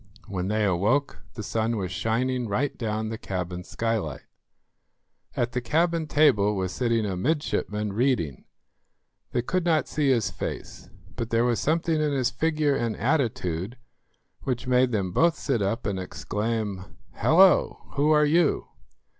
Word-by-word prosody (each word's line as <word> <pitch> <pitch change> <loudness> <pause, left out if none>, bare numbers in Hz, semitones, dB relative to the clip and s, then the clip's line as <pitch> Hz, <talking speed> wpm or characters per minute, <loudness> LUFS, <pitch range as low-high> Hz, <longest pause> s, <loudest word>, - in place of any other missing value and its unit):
When 95 -2 -3
they 105 +1 +1
awoke 105 +10 +1
the 110 - -5
sun 110 +2 -1
was 95 -3 -3
shining 120 +6 -1
right 125 +8 -1
down 110 -2 -2
the 110 -1 -5
cabin 90 -1 -4
skylight. 110 -10 -2 1.1
At 120 0 0
the 125 - -2
cabin 165 +5 +1
table 105 -10 +3
was 95 -1 -2
sitting 115 -2 0
a 95 -2 -2
midshipman 105 - -1
reading. 110 - 0 0.9
They 120 - 0
could 185 +7 0
not 160 -4 +2
see 145 -2 0
his 120 -6 +2
face, - - -6 0.3
but 115 -2 -4
there 115 +1 +2
was 120 -2 +1
something 160 0 +1
in 150 -1 +1
his 130 -3 +1
figure 155 +1 +1
and 115 -4 -2
attitude 115 - -1 0.6
which 125 0 -3
made 125 0 +3
them 100 -5 -1
both 165 - +3
sit 130 -6 -1
up 100 +4 -1
and 100 -2 -1
exclaim, 105 0 -3 0.2
"Hallo! 185 +4 +4
who 145 +2 +2
are 150 -1 +5
you?" 160 +1 +2
115 Hz, 150 wpm, -26 LUFS, 100-145 Hz, 1.1 s, are